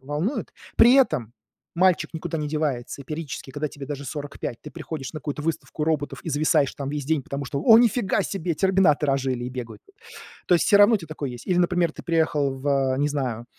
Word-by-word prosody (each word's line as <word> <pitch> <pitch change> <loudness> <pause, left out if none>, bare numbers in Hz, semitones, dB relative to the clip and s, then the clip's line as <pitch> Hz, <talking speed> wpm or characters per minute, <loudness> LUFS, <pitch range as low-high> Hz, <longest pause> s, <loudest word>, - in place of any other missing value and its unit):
волнуют. 155 - -3 0.2
При 240 +2 +7
этом 155 - +2 0.4
мальчик 175 -3 +2
никуда 165 0 -4
не 150 -1 -3
девается, 145 -3 -2
и - - -21
периодически, 150 -3 -6
когда 150 +1 -2
тебе 140 -1 -9
даже 140 -1 -5
45 145 -4 -6
ты - - -9
приходишь 155 -4 -6
на 155 - -6
какую-то 145 0 -5
выставку 155 -1 -3
роботов 145 -4 -1
и - - -4
зависаешь 145 -1 +2
там 140 -2 -5
весь 145 0 -3
день, 155 0 0
потому 140 +1 -5
что: 140 +1 -3
"О, 225 0 +8
ни 240 - +6
фига 220 -4 0
себе! 175 -3 -2
Терминаторы 165 -5 +3
ожили 130 -2 -1
и - - -3
бегают". 125 -3 -7 0.7
То 180 - +4
есть 170 - +3
всё 205 - +6
равно 205 +3 +7
у - - +2
тя 165 - -10
такое 150 -4 -5
есть. 120 -1 -10
Или, 180 - +1
например, 175 -2 +2
ты - - -10
приехал 160 -5 +1
в, 135 -1 +1
не 145 - +2
знаю, 130 -6 -3
150 Hz, 215 wpm, -24 LUFS, 135-170 Hz, 0.7 s, О